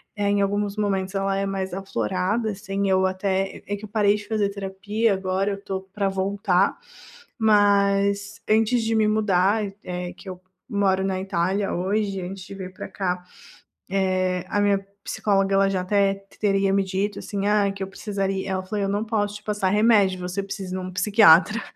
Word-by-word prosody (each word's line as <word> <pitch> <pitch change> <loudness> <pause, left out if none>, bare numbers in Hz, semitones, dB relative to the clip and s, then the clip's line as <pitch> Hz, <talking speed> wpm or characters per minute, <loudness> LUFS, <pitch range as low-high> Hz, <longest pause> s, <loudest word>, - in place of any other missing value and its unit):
eh, 205 -1 0
em 200 0 +2
alguns 205 +1 -1
momentos 195 -2 -1
ela 195 0 0
é 195 - 0
mais 190 -2 -3
aflorada, 195 - -1
assim, 195 0 -3
eu 190 0 +3
até, 190 0 -1
eh - - -16
é 205 - -1
que 205 - -12
eu - - -13
parei 210 -1 +3
de 205 0 -7
fazer 210 -2 0
terapia, 200 +3 -1
agora 190 +1 -1
eu 200 0 -5
tô 190 -1 -3
para 195 +1 -3
voltar. 195 0 +1 0.6
Mas 200 -1 +2
antes 225 +2 +3
de 225 0 0
me 215 -1 +3
mudar 210 0 +2
e 195 - -8
é 180 0 -5
que - - -16
eu 180 -1 -7 0.3
moro 190 -2 +1
na 190 -1 -1
Itália 190 +1 -1
hoje, 195 +1 -1
antes 185 +1 -6
de 195 - -9
vir 185 -1 -7
para - - -7
cá, 180 -2 -3 0.7
eh, 185 -1 0
a 205 - 0
minha 200 -1 +2 0.2
psicóloga, 195 -1 +1
ela 195 0 +4
já 190 -2 -1
até 195 +1 +2
t 195 0 -16
teria 195 -2 +2
me 195 0 +3
dito, 195 +2 -2
assim: 200 -1 -3
"Ah, 205 -1 +3
que 195 - -10
eu 190 - -2
precisaria" 195 -1 -3
ela 190 0 -1
falou: 205 +1 -3
"Eu 195 - 0
não 205 +2 0
posso 210 -2 -1
te 210 - -19
passar 205 -3 0
remédio, 205 -3 +4
você 180 +2 -3
precisa 195 -2 -5
ir - - -2
em - - -4
um 185 - -6
psiquiatra, 210 +1 +5
195 Hz, 200 wpm, -24 LUFS, 190-205 Hz, 0.7 s, psiquiatra